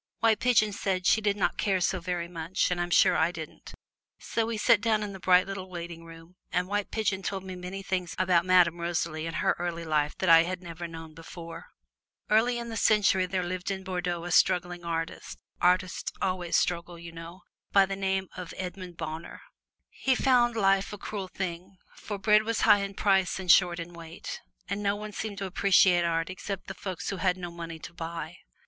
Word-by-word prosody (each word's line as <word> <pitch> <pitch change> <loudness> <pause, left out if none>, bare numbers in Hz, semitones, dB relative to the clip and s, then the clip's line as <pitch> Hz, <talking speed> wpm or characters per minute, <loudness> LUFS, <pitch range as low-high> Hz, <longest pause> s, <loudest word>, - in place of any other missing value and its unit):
White 225 -2 +3
Pigeon 215 -4 +3
said 190 -2 -2
she 220 - +4
did 205 -1 +1
not 195 - 0
care 195 -2 +2
so 185 +1 0
very 175 -1 -3
much, 170 +2 -1
and 175 -1 0
I'm 175 - -2
sure - - +5
I 160 +2 +2
didn't. 160 -3 -9 0.4
So 225 -1 -2
we 230 -1 -2
sat 210 0 +4
down 215 -1 +1
in 205 -1 -5
the 190 - -9
bright 180 0 +5
little 195 -1 -6
waiting 170 -1 -7
room, 165 +2 -14
and 180 0 0
White 205 +1 -1
Pigeon 205 -3 -1
told 190 0 -3
me 185 -1 -7
many 180 +2 -6
things 180 -3 -2
about 180 -2 +3
Madame 175 -2 +4
Rosalie 165 -2 -2
and 165 - -5
her - - +1
early 170 -1 -3
life 150 -2 0
that 190 - -1
I 165 -1 +8
had 180 +2 -3
never 170 0 -6
known 165 -1 -9
before. 165 +1 -10 0.6
Early 235 +3 +4
in 235 0 -5
the 225 - -4
century 205 -3 +3
there 185 0 -1
lived 180 +1 -4
in 190 -1 -3
Bordeaux 180 -2 -3
a 175 - -5
struggling 175 -1 +2
artist 165 -1 -4 0.2
(artists 180 +1 +1
always 180 -2 0
struggle, 170 0 -1
you 170 0 -9
know) 165 +2 -10 0.3
by 195 -1 +6
the 195 0 -4
name 190 -1 -1
of 180 -2 -7
Raymond 180 -2 -6
Bonheur. 160 0 -6 0.5
He 265 -1 +1
found 245 -2 +3
life 195 -2 +2
a 205 - -6
cruel 200 -1 -5
thing, 185 0 -6 0.2
for 205 - -6
bread 210 +2 +4
was 225 0 -2
high 205 - +6
in 200 0 -4
price 195 -2 +2
and 185 -2 +3
short 175 -2 +5
in 170 +1 -7
weight, 165 0 -8 0.3
and 200 +2 -3
no 200 0 +1
one 210 +1 -7
seemed 205 0 -5
to 200 - -3
appreciate 185 -2 +4
art 165 +1 0
except 195 +1 -6
the - - -6
folks 190 -2 -5
who 195 - -4
had 180 +1 +1
no 175 -2 -6
money 165 -1 -7
to 165 - -10
buy. 165 0 -6
185 Hz, 205 wpm, -28 LUFS, 170-195 Hz, 0.6 s, I